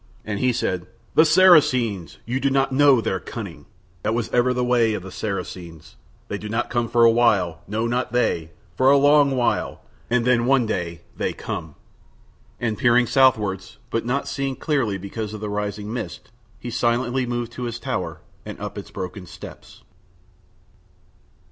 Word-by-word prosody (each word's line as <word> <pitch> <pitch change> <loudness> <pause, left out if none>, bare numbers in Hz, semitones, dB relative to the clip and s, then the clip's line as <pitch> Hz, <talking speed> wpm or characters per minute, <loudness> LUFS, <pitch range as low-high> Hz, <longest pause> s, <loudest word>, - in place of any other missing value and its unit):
And 105 -2 -3
he 125 - +2
said, 95 -6 -2 0.3
"The 160 - +6
Saracens! 130 - +4
You 125 +3 -2
do 140 - +1
not 135 0 +1
know 135 -2 +5
their 95 -3 -1
cunning. 90 -9 -8 0.3
That 110 - 0
was 115 -2 -2
ever 125 +1 +2
the 125 0 0
way 120 -3 +2
of 95 - -5
the 95 - -9
Saracens. 90 -5 -6 0.3
They 100 - -4
do 105 - -7
not 115 +2 -2
come 120 -1 0
for 120 -1 +3
a 115 - +7
while, 100 -8 +2
no 110 +3 -1
not 120 +1 -1
they, 85 -10 0 0.3
for 130 +1 +4
a 140 - +6
long 145 -1 +4
while, 120 -1 0 0.3
and 120 -1 +1
then 120 -1 +3
one 135 -2 +4
day 85 -6 -3
they - - -2
come." 80 -3 -6 0.8
And 110 -3 -2
peering 120 -1 +4
southwards, 105 -6 +2
but 115 - 0
not 130 +4 -1
seeing 135 -1 -2
clearly 130 -8 0
because 105 +3 -6
of - - -7
the 105 0 -4
rising 105 +1 -3
mist, 120 -1 -6 0.3
he 120 - -6
silently 120 +2 0
moved 120 -1 -3
to 125 0 -5
his 120 -1 -4
tower - - -4 0.2
and - - -8
up - - -5
its - - -10
broken 90 0 -7
steps. - - -12
115 Hz, 175 wpm, -23 LUFS, 100-125 Hz, 0.8 s, a